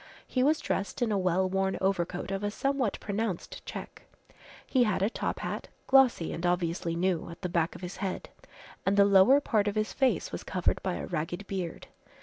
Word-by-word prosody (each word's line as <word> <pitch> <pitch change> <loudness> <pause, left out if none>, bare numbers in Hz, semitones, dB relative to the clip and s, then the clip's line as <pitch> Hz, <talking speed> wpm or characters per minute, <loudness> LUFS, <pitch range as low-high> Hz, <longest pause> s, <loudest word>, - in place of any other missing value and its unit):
He 255 - -1
was 300 +4 +4
dressed 200 -2 -2
in 230 - 0
a 205 - +2
well 185 0 +2
worn 190 +1 0
overcoat 185 -1 -1
of 195 +1 -2
a 205 - +1
somewhat 270 0 -1
pronounced 205 -3 -3
check, - - -7 0.6
he 255 -3 +3
had 205 -4 +1
a 210 - +2
top - - -2
hat, - - -4 0.2
glossy 265 -10 +4
and 165 - -5
obviously 170 -1 0
new, 175 -1 0
at 170 - -10
the 180 - -1
back 170 -1 0
of - - -10
his 180 +1 -6
head, 190 -3 -4 0.5
and 195 +1 +1
the 200 - +7
lower 200 +8 +6
part 215 -7 +1
of 205 - -1
his 215 0 -1
face 255 - +1
was - - -5
covered 180 -2 0
by 185 -2 -1
a - - -4
ragged 175 +3 -3
beard. 185 -4 -4
195 Hz, 200 wpm, -29 LUFS, 175-215 Hz, 0.6 s, the